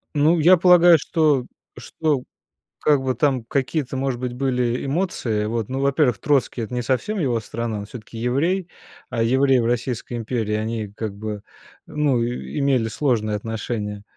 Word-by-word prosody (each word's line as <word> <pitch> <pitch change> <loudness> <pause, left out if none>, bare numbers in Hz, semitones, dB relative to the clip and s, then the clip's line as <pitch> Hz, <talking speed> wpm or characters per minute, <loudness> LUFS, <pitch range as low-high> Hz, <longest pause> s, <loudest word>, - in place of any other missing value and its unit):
Ну, 155 +4 +4
я 180 +4 +6
полагаю, 175 -1 +6
что 150 -5 +1 0.3
что 150 -5 -2 0.6
как 145 -2 +3
бы 130 -1 0
там 135 -5 +1
какие-то, 135 +2 -2
может 130 -2 -1
быть, 125 -1 -3
были 125 -2 -1
эмоции. 135 - -1
Вот, 115 -1 -2
ну, 130 +1 -3
во-первых, 140 -4 +2
Троцкий. 135 -1 +1
Это 115 +3 -5
не 125 - -1
совсем 130 - -1
его 125 -7 +1
страна, 115 0 -4
он 100 - -7
всё-таки 115 0 -10
еврей, 165 +10 0 0.4
а 115 - -1
евреи 130 +3 +3
в 115 - 0
Российской 120 0 -2
империи, 115 -2 -2
они 110 0 -2
как 105 -1 -5
бы, 105 -1 -5 0.4
ну, 145 -5 +1
и 120 +5 -4
имели 135 -5 +2
сложные 110 -4 0
отношения 105 -1 -4
125 Hz, 160 wpm, -22 LUFS, 115-145 Hz, 0.6 s, я